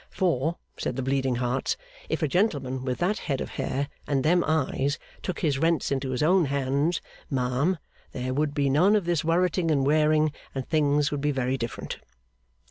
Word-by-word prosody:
For 165 Hz, -3 st, 0 dB, 0.2 s
(said -, -, -2 dB
the 135 Hz, -, -2 dB
Bleeding 135 Hz, -1 st, +1 dB
Hearts), 125 Hz, +2 st, -1 dB, 0.3 s
if -, -, -1 dB
a -, -, +3 dB
gentleman 140 Hz, -, 0 dB
with 130 Hz, -1 st, -2 dB
that 195 Hz, +5 st, 0 dB
head 135 Hz, -5 st, -2 dB
of -, -, -4 dB
hair 140 Hz, +2 st, -2 dB, 0.2 s
and 135 Hz, -2 st, +1 dB
them 175 Hz, +2 st, +4 dB
eyes 145 Hz, -2 st, +1 dB, 0.2 s
took 185 Hz, -, -4 dB
his 145 Hz, -5 st, +1 dB
rents 165 Hz, -2 st, +1 dB
into 135 Hz, -1 st, -1 dB
his 130 Hz, +2 st, -1 dB
own 180 Hz, +2 st, +4 dB
hands, 140 Hz, +4 st, 0 dB, 0.3 s
ma'am, 135 Hz, +6 st, +1 dB, 0.3 s
there 130 Hz, +1 st, -3 dB
would 145 Hz, +1 st, 0 dB
be 140 Hz, -1 st, +2 dB
none 175 Hz, +10 st, +4 dB
of 205 Hz, -4 st, +1 dB
this 170 Hz, -3 st, +1 dB
worriting 170 Hz, +1 st, +2 dB
and 140 Hz, -3 st, +2 dB
wearing, 155 Hz, +1 st, +3 dB, 0.2 s
and 130 Hz, -1 st, -3 dB
things 145 Hz, -2 st, +2 dB
would 145 Hz, -2 st, -2 dB
be 150 Hz, -, +1 dB
very 130 Hz, -2 st, 0 dB
different. 115 Hz, -3 st, -5 dB
145 Hz, 185 wpm, -26 LUFS, 135-165 Hz, 0.3 s, them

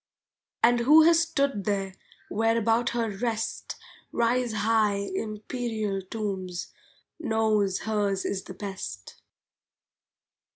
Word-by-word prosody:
'" -, -, -56 dB
And 240 Hz, +1 st, +5 dB
who 300 Hz, +7 st, +7 dB
has 330 Hz, 0 st, +6 dB
stood 280 Hz, -, 0 dB
there, 195 Hz, -2 st, -1 dB, 0.3 s
where 225 Hz, +2 st, +1 dB
about 230 Hz, +2 st, +2 dB
her 235 Hz, -1 st, -1 dB
Rest 225 Hz, +1 st, -3 dB, 0.4 s
Rise 240 Hz, +1 st, +1 dB
high 210 Hz, -2 st, +1 dB
Imperial 215 Hz, 0 st, -3 dB
tombs, 190 Hz, -3 st, -4 dB, 0.5 s
knows 220 Hz, -, +1 dB
hers 205 Hz, -3 st, 0 dB
is 190 Hz, -, -1 dB
best. 190 Hz, -, -7 dB
220 Hz, 100 wpm, -27 LUFS, 200-235 Hz, 0.5 s, who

